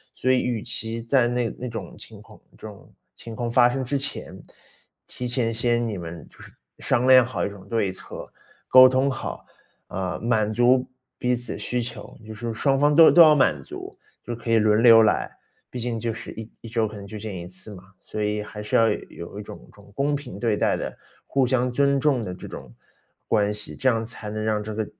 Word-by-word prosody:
所 130 - -1
以 130 - +4
与 120 -4 -2
其 115 +1 -5
在 120 0 +2
那 120 -1 0
那 125 - -5
种 110 -6 -7
情 - - -13
况， - - -16 0.2
这 110 - -9
种 100 -2 -14 0.2
情 115 - -10
况 120 +1 -3
发 120 +1 +5
生 130 +1 -3
之 140 +3 -1
前， 140 +1 -5 0.7
提 125 -1 -6
前 120 -2 -1
先 120 +1 0
你 105 - -4
们 85 -2 -8
就 - - -23
是 - - -13 0.3
商 125 0 +1
量 130 -1 +8
好 110 -8 -2
一 - - -2
种 100 -2 -12
对 110 -4 0
策， 95 - -8 0.4
沟 130 0 +9
通 130 +2 +2
好， 130 - -5 0.4
啊， 95 -1 -4
满 110 -2 +1
足 125 +3 +3 0.3
彼 125 0 0
此 120 -1 -4
需 125 0 -2
求， 120 - -8
就 110 - -8
是 115 +2 -4
双 135 +4 +1
方 145 +2 +3
都 160 +1 +8
都 175 - +7
要 155 -2 +9
满 75 - +2
足， - - -9 0.2
就 120 - -5
可 115 0 -5
以 115 - +5
轮 105 +1 +3
流 115 -2 +8
来， - - +1 0.4
毕 125 - -6
竟 120 -1 -3
就 115 0 -2
是 115 +1 -8
1 110 0 -9
1 115 - -10
周 115 -1 0
可 105 0 -7
能 100 0 -9
就 110 +2 -8
见 105 0 -6
1 90 -1 -7
次 95 +3 -9
嘛。 90 - -12 0.2
所 105 - -6
以 105 0 -1
还 105 0 -9
是 105 - -3
要 115 0 +5
有 - - -1
有 85 +4 -9
一 105 - -6
种 - - -11
一 - - -18
种 100 0 -18
公 145 +1 +1
平 135 -8 -7
对 110 -1 0
待 - - +2
的， - - -5 0.3
互 135 -1 +1
相 125 0 +1
尊 140 +2 +2
重 135 -5 +1
的 90 - -5
这 - - -11
种 65 - -9 0.6
关 105 -1 +1
系， 105 0 -7
这 130 - -2
样 115 -2 +2
才 110 -2 -8
能 110 0 -4
让 110 -1 0
这 110 0 -6
个 110 0 -1
115 Hz, 240 characters per minute, -24 LUFS, 105-125 Hz, 0.7 s, 沟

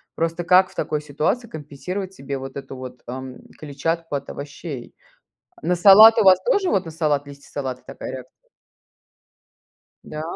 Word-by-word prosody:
Просто 165 +1 -2
как 185 +2 +5
в - - -19
такой 150 - -2
ситуации 150 - -2
компенсировать 180 +5 -6
себе 140 -5 -5
вот 135 0 -8
эту 135 -1 -7
вот, 125 -1 -9
эм, 130 +1 -8
клетчатку 160 +2 -3
от 140 0 -5
овощей? 145 -2 -8 0.7
На 180 - +1
салат 210 +5 +8
у - - +4
вас 190 -1 +7
тоже, 410 -7 +1
вот, 190 -2 +1
на 165 - -7
салат 150 -3 0
листья 140 0 -13
салата 130 -3 -4
такая - - -8
реакция? 130 -1 -10 1.6
Да? 155 - -7
150 Hz, 155 wpm, -22 LUFS, 135-180 Hz, 1.6 s, салат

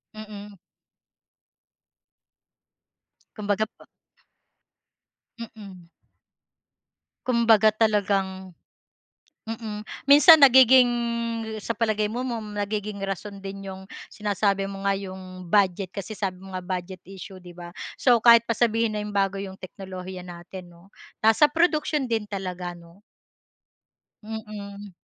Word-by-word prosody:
Mm. 210 -1 -10 2.8
Kumbaga, 210 0 0
pa - - -17 1.5
Mm. 200 -6 -11 1.4
Kumbaga 225 -3 +4
talagang 195 -4 0 0.9
mm. 215 -2 -6 0.2
Minsan 295 +2 +8
nagiging 260 -1 +7 0.7
sa - - -2
palagay 215 -2 0
mo 250 +3 -3
mom 225 -4 -5
nagiging 205 0 -3
rason 195 +1 -5
din 195 0 -8
'yong 190 0 -10 0.2
sinasabi 200 -1 0
mo 195 0 -7
nga, 200 - +2
'yong 185 -2 -9
budget. 190 0 +2
Kasi 200 +1 -6
sabi 190 -3 -4
mo 195 - -11
nga, 185 - -3
budget 185 0 -5
issue 190 0 -10
'di 175 -1 -13
ba? 175 0 -9 0.2
So, 245 -3 +4
kahit 235 0 +7
pa 235 - -3
sabihin 230 -1 +1
na 210 - -3
'yong 210 -1 -6
bago 195 0 +1
'yong 195 -1 -6
teknolohiya 185 -1 -9
natin, 175 +1 -10
'no? 175 +4 -20 0.3
Nasa 225 +7 +6
produksiyon 305 -4 0
din 220 -2 -1
talaga, 180 -3 -5
'no? 170 +2 -17 1.2
Mm. 205 -2 -8
205 Hz, 115 wpm, -25 LUFS, 190-220 Hz, 2.8 s, Minsan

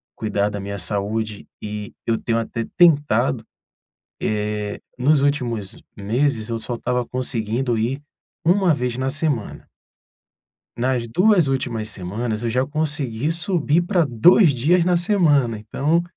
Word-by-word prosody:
cuidar 105 -1 -1
da 105 -1 -5
minha 100 +1 -5
saúde, 105 +3 -2
e 105 -1 -6
eu 115 -1 +1
tenho 115 -1 0
até 115 0 -3
tentado, 140 - +3 0.8
eh, 105 -1 -2 0.2
nos 140 +3 +3
últimos 120 -8 -1 0.2
meses 115 +3 0
eu 115 - -2
só 120 +2 -4
estava 125 +1 -1
conseguindo 120 -1 -1
ir 130 +6 -2 0.4
1 180 -1 +3
vez 125 -1 -2
na 130 0 -1
semana. 145 -8 -2 1.1
Nas 120 -1 0
2 180 - +3
últimas 120 -5 -2
semanas, 105 +4 -3
eu 115 - -1
já 130 +3 +1
consegui 145 -3 -1
subir 170 -2 +1
para 175 -2 +1
2 145 - +5
dias 165 +8 +2
na 180 0 +2
semana, 155 - +3
então, 145 +10 0
125 Hz, 135 wpm, -21 LUFS, 110-150 Hz, 1.1 s, 2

